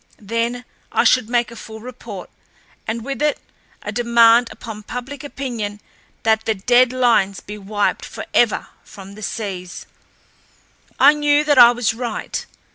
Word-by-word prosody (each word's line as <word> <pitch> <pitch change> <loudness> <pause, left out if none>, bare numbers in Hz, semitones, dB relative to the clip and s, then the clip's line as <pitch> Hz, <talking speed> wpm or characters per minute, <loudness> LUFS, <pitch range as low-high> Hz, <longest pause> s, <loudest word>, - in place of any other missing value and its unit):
Then 230 +4 -3 0.3
I - - +2
should 250 -3 +3
make 240 -1 +1
a - - -10
full 220 -1 -10
report, 225 -5 -9 0.6
and 225 +1 -3
with 275 +1 -4
it 300 -1 +1 0.4
a - - -4
demand 235 0 +5
upon 220 -3 -8
public 250 +6 -7
opinion 235 -8 -5 0.4
that 220 -1 +2
the 220 - +1
dead 245 +5 +4
lines 235 -7 +2
be 210 +1 -9
wiped 205 +1 -1
forever - - 0
from 195 0 -12
the 215 - -12
seas. 185 -3 -5 1.1
I 285 +2 +8
knew 295 0 +2
that 290 -3 +3
I 240 -1 +10
was 240 -2 0
right. 235 -1 -4
235 Hz, 145 wpm, -20 LUFS, 215-250 Hz, 1.1 s, I